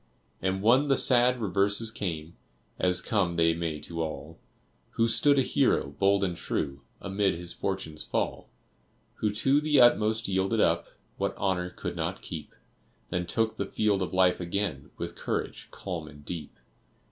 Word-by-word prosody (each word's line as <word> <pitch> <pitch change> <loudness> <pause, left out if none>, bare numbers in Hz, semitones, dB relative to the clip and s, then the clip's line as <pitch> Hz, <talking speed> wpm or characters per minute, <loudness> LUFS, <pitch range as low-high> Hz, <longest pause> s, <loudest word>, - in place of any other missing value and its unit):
And 95 +1 -1
when 130 +6 +5
the 135 -2 +3
sad 125 0 +4
reverses 100 +2 +1
came, 85 -6 -5 0.4
As 90 -1 +2
come 95 -6 0
they 85 0 +3
may 80 -2 -3
to 85 -1 -5
all, 80 +1 -6 0.5
Who 115 - +2
stood 140 +5 +4
a 135 - +4
Hero, 70 - +2
bold 100 +5 +2
and 90 -3 -1
true, 70 -4 -3 0.2
Amid 100 -1 0
his 85 +1 -4
fortune's 95 -6 -3
fall? - - -2 0.7
Who 105 - 0
to 135 +7 +2
the 150 -1 +3
utmost 110 -2 +4
yielded 95 +3 0
up 85 -4 +2 0.3
What - - -1
Honor 90 -2 0
could 90 - -6
not - - -3
keep, 80 -3 -8 0.6
Then 90 -1 -1
took 110 +4 0
the 100 - -2
field 105 -2 +1
of 95 - -2
life 95 -1 +3
again 85 -5 -3
With - - -5
courage - - -4
calm - - -6
and 75 0 -14
deep? 85 -3 -7
95 Hz, 160 wpm, -28 LUFS, 85-110 Hz, 0.7 s, when